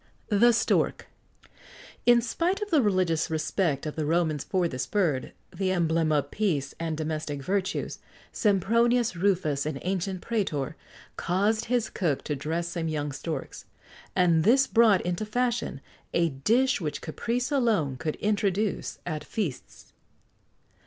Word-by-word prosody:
THE 230 +3 +5
STORK. 230 - +1 1.0
In 240 -1 +6
spite 340 - 0
of 420 -1 -5
the 310 -4 +5
religious 185 -7 +1
respect 160 -2 0
of 150 - -4
the 155 -2 -2
Romans 160 -3 +1
for 185 -3 0
this 130 -4 -4
bird, 160 -10 0 0.2
the 190 -1 0
emblem 165 -3 +1
of 145 -2 +1
peace[XX 155 -10 -1
81] - - -27
and 165 -2 -2
domestic 155 -2 -3
virtues, 190 +3 -2 0.3
Sempronius 230 +3 +2
Rufus, 170 -6 +1
an 155 -3 -3
ancient 185 0 -2
prætor, 165 - -1 0.4
caused 205 +5 +1
his 240 -2 0
cook 160 -8 -1
to 150 - -2
dress 165 +5 -2
some 170 -2 -3
young 150 -2 -2
storks; 155 +4 -5 0.5
and 170 -3 +4
this 265 +7 +5
brought 225 -7 +4
into 175 +3 -2
fashion[XX 235 - -1 0.3
82] 170 - +4
a - - +1
dish 230 - +2
which 150 -3 -3
caprice 240 - -2
alone 220 - +1
could 150 +5 -3
introduce 205 -1 -1
at 155 -3 -3
feasts. 130 - -5
180 Hz, 145 wpm, -27 LUFS, 155-220 Hz, 1.0 s, In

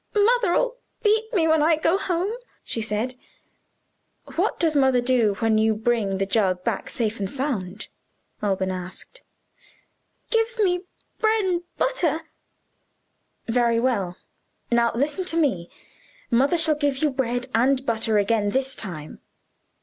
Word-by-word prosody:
"Mother'll 475 +2 +2 0.3
beat 440 +1 +2
me 345 -8 +2
when 315 -1 +4
I 320 +2 +4
go 325 +3 +1
home," 370 0 -1 0.3
she 225 - -3
said. 215 +4 -1 1.2
"What - - 0
does 320 -3 +2
mother 265 -3 +4
do 240 -4 +2
when 220 0 +2
you 220 0 +2
bring 215 -3 0
the 195 - 0
jug 190 -3 +1
back - - -2
safe 225 -2 -2
and 195 -1 -2
sound?" 220 -8 -3 0.5
Alban 190 -2 0
asked. 185 - -7 1.1
"Gives 455 +1 +1
me 360 -3 +1 0.4
bren 415 -5 +2 0.2
butter." 330 - 0 1.3
"Very 235 0 +2
well. 205 -8 0 0.5
Now 235 0 +3
listen 295 +9 0
to 330 - 0
me. 200 - +1 0.6
Mother 270 +8 +3
shall 320 -1 +5
give 290 -2 0
you 300 +1 +1
bread 245 -2 -1
and 265 +3 +2
butter 220 -2 +1
again 205 0 +2
this 265 +4 -1
time." 155 -7 -6
255 Hz, 135 wpm, -24 LUFS, 215-330 Hz, 1.3 s, shall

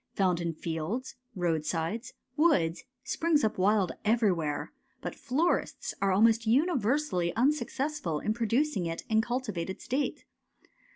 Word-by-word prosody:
Found 180 -3 +2
in 170 -1 -1
fields, 165 +11 -3 0.2
roadsides, 170 +5 -1 0.2
woods, 250 - +2 0.2
springs 320 -4 +1
up 215 -3 0
wild 195 -1 +3
everywhere, 195 -9 +1 0.3
but - - -5
florists 295 +7 -1
are 195 -1 +3
almost 225 +3 +4
universally 250 - +1
unsuccessful 275 - 0
in 215 - 0
pro 230 0 -2
ducing 240 - +1
it 165 0 -4
in 220 0 +4
cultivated 220 -7 -3
state. 275 +3 -2
220 Hz, 120 wpm, -29 LUFS, 175-260 Hz, 0.3 s, almost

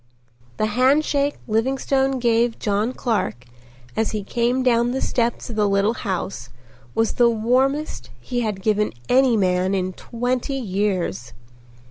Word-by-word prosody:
The - - +1
handshake 280 +5 +2
Livingstone 265 +4 +1
gave 235 -1 +2
John 210 +3 0
Clark 205 - -2 0.5
as 220 - 0
he 210 -2 -2
came 240 +4 0
down 240 -1 +2
the 265 - -1
steps 235 -2 -1
of - - -6
the 210 -1 +2
little 200 +3 +2
house 190 - -4 0.5
was 225 0 +1
the 240 -1 +4
warmest 260 +7 0
he 245 -1 -3
had 210 -5 -2
given 210 -1 +1 0.2
any 255 -2 +4
man 185 0 +1
in 185 -1 -1
twenty 245 +6 -2
years. 185 - -2
230 Hz, 135 wpm, -22 LUFS, 200-255 Hz, 0.5 s, the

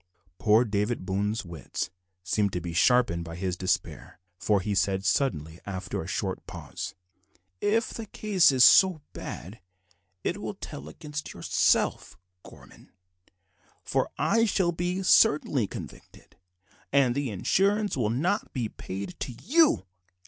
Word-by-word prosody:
Poor 110 +3 +4
David 105 -1 -1
Boone's 100 +3 -1
wits 85 -2 -5 0.3
seemed 100 +1 0
to 90 - -1
be 85 0 -6
sharpened 120 -3 +3
by 85 0 -8
his 90 0 -2
despair, 95 0 -3 0.2
for 105 -2 +2
he 100 +2 -2
said 95 0 0
suddenly, 80 - 0
after 95 -2 -4
a - - -7
short - - -3
pause - - -7 0.6
"If 225 - +1
the 225 -1 -6
case 200 -6 +3
is 130 -2 +4
so 185 0 +7
bad 95 +8 -8 0.6
it - - -2
will - - -5
tell 70 +2 -8
against 150 - -7
yourself, - - +1 0.2
Gorman, - - -16 0.9
for - - 0
I 230 0 +3
shall 185 -4 +1
be 175 +3 -2
certainly 150 - +4
convicted, - - -11 0.6
and 135 -3 +4
the 140 0 -2
insurance 200 - +1
will 120 -6 0
not 155 - -1
be 120 -4 -2
paid 100 - -6
to 125 - -4
you." 295 - +3
115 Hz, 135 wpm, -27 LUFS, -, 0.9 s, so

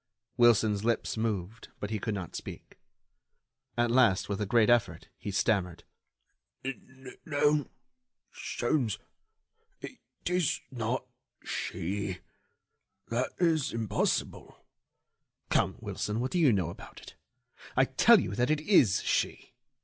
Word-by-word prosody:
Wilson's 110 -4 +4
lips 115 0 0
moved, 110 -2 -3
but 105 - -5
he 110 - -1
could 110 0 -2
not 95 -4 -6
speak. - - -9 1.0
At 120 0 +2
last, 115 -7 +3
with 100 +1 -2
a 105 - -1
great 115 0 +4
effort, 120 -1 +1
he - - -7
stammered: 95 -4 0 1.4
"No... 145 -1 +1 0.6
Sholmes... 120 -4 -1 0.8
it - - -9 0.3
is 180 -3 +1
not 125 +1 -2 0.4
she... 95 +1 -3 0.9
that 120 +3 0
is 165 -5 +2
impossible——" 115 -2 -2 0.9
"Come, - - +2
Wilson, 105 +2 -3
what 130 +2 -2
do 180 - +1
you 150 -6 +5
know 90 -5 0
about - - -12
it? - - -13 0.6
I - - +6
tell - - +6
you 95 - -3
that 120 +5 +1
it 155 -1 +1
is 145 - +4
she! - - -1
115 Hz, 120 wpm, -30 LUFS, 100-130 Hz, 1.4 s, I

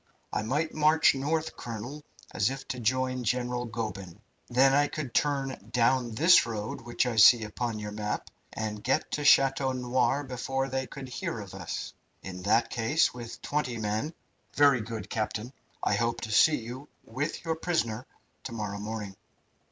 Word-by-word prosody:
"I - - 0
might 145 +9 -1
march 155 +1 +4
north, 155 +4 -1
colonel, 120 +6 -7 0.3
as 100 - +2
if 135 0 -6
to 125 - -3
join 130 +2 0
General 125 +1 -1
Goeben. 105 -5 -5 0.3
Then 130 +2 +5
I 145 +1 +4
could 145 -6 -5
turn 135 -7 -1
down 120 -1 +2
this 165 +4 +6
road 110 -1 -4
which 120 +2 -1
I 120 -2 -2
see 110 +2 +8
upon 110 +1 -3
your 105 0 -5
map, 105 0 -4 0.2
and 105 -1 -4
get 130 - 0
to 150 - -2
Chateau 135 -2 +5
Noir 130 +3 +1
before 135 +1 -2
they 130 0 -2
could 135 -1 -8
hear 125 -2 -4
of 100 -3 -9
us. - - -5 0.3
In 90 -1 -7
that 110 +5 +2
case, 120 +7 +2
with 120 -2 -9
twenty 125 -5 -1
men 110 +9 -2 0.2
" - - -41
"Very 140 -4 +5
good, 110 0 -6
captain. 110 +3 -3 0.3
I - - +2
hope 115 +3 0
to 110 - -5
see 150 +8 +5
you 125 +5 -8 0.2
with 145 +8 -4
your 165 -1 0
prisoner 130 -9 -1 0.4
to - - -5
morrow 105 -3 -4
morning." 105 -2 -5
125 Hz, 170 wpm, -29 LUFS, 110-135 Hz, 0.4 s, see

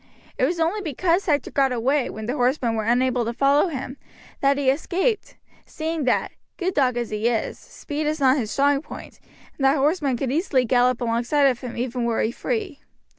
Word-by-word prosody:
It - - +2
was 335 +5 -1
only 340 +6 0
because 345 +3 0
Hector 295 -3 0
got 270 -2 +2
away, 255 +2 +1
when 220 0 -7
the 245 - -2
horsemen 250 -3 +1
were 220 -1 -2
unable 245 +1 +2
to 230 +1 -3
follow 280 +7 +3
him, 270 -4 -5 0.4
that 275 0 +2
he 280 -2 -1
escaped, 380 - -1 0.3
seeing 315 -2 -3
that, 255 - +1 0.3
good 370 0 -1
dog 255 -5 +2
as 240 -2 -3
he 215 +2 0
is, 235 -2 -1
speed 295 +1 -5
is 310 +1 -1
not 265 0 +4
his 225 -6 -2
strong 280 +3 +2
point, - - -11 0.4
and - - -2
that 270 +3 +4
horsemen 285 -2 +1
could 255 0 -2
easily 280 -4 +1
gallop 250 +1 +2
alongside 240 +5 +1
of 255 -3 +2
him 245 -3 -7
even 245 0 -2
were 235 -1 0
he 220 - 0
free. 375 - -3
270 Hz, 200 wpm, -23 LUFS, 245-300 Hz, 0.4 s, not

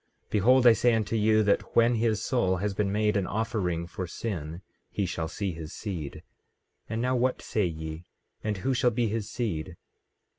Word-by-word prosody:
Behold, 125 +5 +4
I 120 - +9
say 120 +1 +3
unto 110 0 -1
you, 110 0 +4
that 100 -1 0
when 115 +1 +5
his 110 -2 +1
soul 95 -8 +1
has 100 +2 -1
been 100 0 0
made 105 0 +1
an 100 -3 +1
offering 100 -6 -1
for 90 +1 -5
sin 85 -3 -5 0.3
he 100 - -1
shall 85 -2 -3
see 95 +4 -3
his 80 0 -8
seed. 85 -10 -5 0.7
And 110 +2 -2
now 130 +1 +1
what 125 +1 +1
say 105 -4 0
ye? 80 0 -6 0.4
And 105 -2 -1
who 130 +8 0
shall 125 0 +3
be 115 -1 0
his 110 -1 -3
seed? 90 -8 -3
105 Hz, 185 wpm, -28 LUFS, 90-115 Hz, 0.7 s, I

